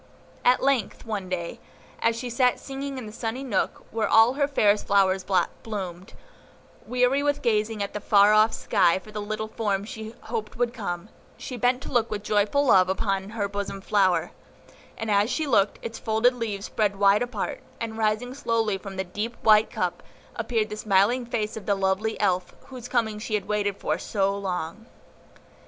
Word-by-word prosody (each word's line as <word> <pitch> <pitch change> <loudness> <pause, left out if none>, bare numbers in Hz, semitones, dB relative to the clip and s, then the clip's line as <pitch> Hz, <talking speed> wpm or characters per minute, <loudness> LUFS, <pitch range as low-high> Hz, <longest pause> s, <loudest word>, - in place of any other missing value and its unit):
At 250 +1 +4
length, 270 -6 0
one 205 -4 -4
day, 175 -2 -4 0.4
as 230 - +2
she 245 +2 -5
sat 250 +1 +2
singing 275 0 -6
in 250 - -6
the 210 - -8
sunny 230 +3 -4
nook 250 -6 -2
where 220 0 0
all 225 +3 +6
her 285 0 +1
fairest 210 -7 +2
flowers 195 -1 +3 0.4
bloomed, 190 -5 -6 0.7
weary 250 +3 +2
with 290 0 0
gazing 215 -2 +1
at 200 - -6
the 210 - -3
far 205 0 +5
off 215 +1 +5
sky 185 -6 +2
for 215 +3 -11
the 210 0 -4
little 215 +1 -3
form 205 -3 -1
she 220 +1 -8
hoped 220 -2 -5
would 240 0 0
come, 195 -4 -5 0.3
she 255 - -6
bent 250 +2 +1
to - - -7
look 235 -2 +2
with 205 -1 -4
joyful 215 +8 +2
love 185 -7 +5
upon 195 0 -1
her 215 -2 -2
bosom 200 -1 -4
flower; 190 -2 +2 0.7
and 225 -1 -3
as 205 +2 +3
she 305 +5 -1
looked, 210 -7 +2
its 225 - -6
folded 220 +3 +2
leaves 220 -4 -4
spread 205 -2 0
wide 200 +1 +4
apart, 245 -5 -3 0.2
and, 225 -1 -4
rising 220 +3 0
slowly 225 -6 0
from 195 -1 -8
the 190 - -1
deep 210 +6 -4
white 215 -1 +6
cup, - - -2 0.3
appeared 225 -3 -1
the 210 - -4
smiling 215 +4 +2
face 225 -2 -2
of 220 - -8
the 200 - +3
lovely 195 +3 0
Elf 180 -1 0
whose 250 -3 -8
coming 220 -4 0
she 215 0 -2
had 205 -2 -3
waited 205 -1 0
for - - -1
so 195 -1 0
long. 190 +2 -4
215 Hz, 185 wpm, -25 LUFS, 200-235 Hz, 0.7 s, all